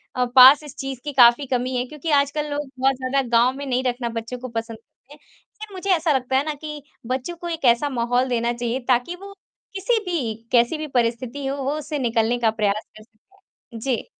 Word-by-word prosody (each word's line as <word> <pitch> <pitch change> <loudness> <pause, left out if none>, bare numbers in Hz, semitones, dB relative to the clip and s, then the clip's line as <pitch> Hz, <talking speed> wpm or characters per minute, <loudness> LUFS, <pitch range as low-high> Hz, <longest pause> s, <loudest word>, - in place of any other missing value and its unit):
अ, 250 -1 +1
पास 265 +3 +9
इस 295 -2 -11
चीज़ 270 -2 -5
की 295 -1 -5
काफ़ी 245 +1 +6
कमी 255 0 -1
है 245 - -1
क्योंकि 300 +4 -7
आजकल 295 +2 -3
लोग 290 -1 -3
बहुत 270 +1 +2
ज़्यादा 260 +1 0
गाँव 240 +2 +4
में 285 - -6
नहीं 255 -1 -1
रखना 245 -1 -2
बच्चों 230 +2 -5
को 255 - -6
पसंद 230 -1 -5
करते 240 +4 -22
है, - - -15
लेकिन 410 +7 -15
मुझे 385 +1 -5
ऐसा 325 -1 0
लगता 265 0 0
है 270 - +2
ना 310 - -2
कि 300 0 -8 0.3
बच्चों 260 +7 -3
को 345 +1 -7
एक 325 -4 -4
ऐसा 240 +4 +3
माहौल 245 0 0
देना 235 -1 0
चाहिए 240 +1 -2
ताकि 250 +7 +1
वो 395 +2 -11 0.4
किसी 420 +4 +1
भी, 275 -12 -2 0.2
कैसी 240 +5 +3
भी 305 0 -5
परिस्थिति 245 +1 -1
हो 270 - -2
वो 275 - -1
उससे 300 -1 -4
निकलने 235 -1 +1
का 225 -2 +2
प्रयास 215 -1 -1
कर 215 - -13
सकें। 235 - -18
जी। 250 0 -2
260 Hz, 220 wpm, -22 LUFS, 240-295 Hz, 0.4 s, पास